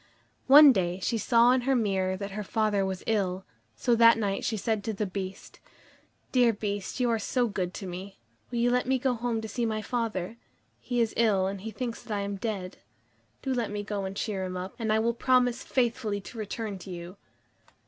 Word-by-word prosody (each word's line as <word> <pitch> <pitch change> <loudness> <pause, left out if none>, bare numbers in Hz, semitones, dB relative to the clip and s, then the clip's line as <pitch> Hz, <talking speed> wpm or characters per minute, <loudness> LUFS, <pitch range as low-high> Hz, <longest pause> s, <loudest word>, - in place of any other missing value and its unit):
One 285 +1 +10
day, 180 -3 -1
she 225 +4 -1
saw 235 +3 +5
in 255 0 +3
her 265 +2 +1
mirror 190 -5 0
that 200 0 -5
her 210 +2 -4
father 210 -1 +1
was 190 -1 -3
ill, 190 -4 0 0.3
so 245 - +1
that 230 0 +7
night 200 -3 -1
she 220 - -1
said 215 0 -1
to 220 - -1
the 210 +1 -2
Beast: 190 0 -7 0.7
"Dear 245 -3 +5
Beast, 205 +1 -4
you 250 - +2
are 225 - +1
so 245 +3 0
good 185 -4 -2
to 195 - -6
me, 185 +2 -7 0.3
will 240 - -4
you 240 +1 +3
let 250 0 +1
me 265 0 +3
go 255 0 +1
home 235 -1 -2
to 220 - -5
see 235 +3 -3
my 215 -1 -1
father? 225 -3 -3 0.4
He 245 -1 -1
is 225 -1 0
ill, 210 -5 +3
and 195 0 -3
he 225 - -5
thinks 235 +1 -5
that 215 - -4
I - - -1
am 200 0 -3
dead. 195 -3 -4 0.7
Do 265 - -1
let 240 -3 -1
me 205 0 -4
go 205 -1 -3
and 190 +1 -5
cheer 200 -4 -2
him 185 0 -4
up, 185 +1 -5
and 220 -2 0
I 215 - +4
will 230 +2 +1
promise 250 0 +2
faithfully 235 -4 0
to 215 +4 -11
return 210 -1 -4
to 190 - -11
you." 175 +1 -8
215 Hz, 220 wpm, -28 LUFS, 195-235 Hz, 0.7 s, One